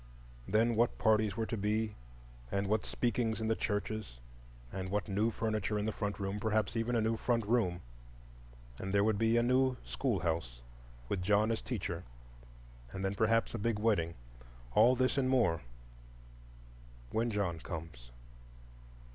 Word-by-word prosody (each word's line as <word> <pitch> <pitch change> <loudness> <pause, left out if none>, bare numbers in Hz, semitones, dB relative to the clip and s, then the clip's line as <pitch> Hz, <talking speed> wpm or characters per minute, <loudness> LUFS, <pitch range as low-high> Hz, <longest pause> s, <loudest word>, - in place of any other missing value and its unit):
Then 115 +4 +3
what 115 +2 +2
parties 110 -2 +2
were 115 - 0
to 115 - -3
be, 105 +1 0 0.6
and 100 0 0
what 105 +2 0
speakings 115 -2 0
in 110 0 -1
the 110 - +3
churches; 105 - -3 0.6
what 95 0 -2
new 105 +3 +1
furniture 110 -2 -1
in 105 - -1
the 110 - 0
front 105 -1 -3
room,—perhaps 105 +2 0
even 115 +2 0
a 115 - +3
new 110 +1 +1
front 115 -1 0
room; 100 -6 +1 1.0
and 95 +1 -2
there 100 - +5
would 105 -1 +2
be 115 +1 +3
a 120 - +4
new 130 +1 +3
schoolhouse, 80 - -2 0.4
with 90 - -1
John 105 +4 +3
as 115 - -1
teacher; 95 -7 -4 0.9
and 95 0 -4
then 95 - 0
perhaps 115 +3 +2
a 115 - -3
big 115 +1 0
wedding; 100 -7 +1 0.6
all 120 +4 +6
this 130 +2 +2
and 130 -1 +1
more—when - - -4
John 100 -6 -1
comes. 80 -8 -7
105 Hz, 145 wpm, -33 LUFS, 85-115 Hz, 1.0 s, all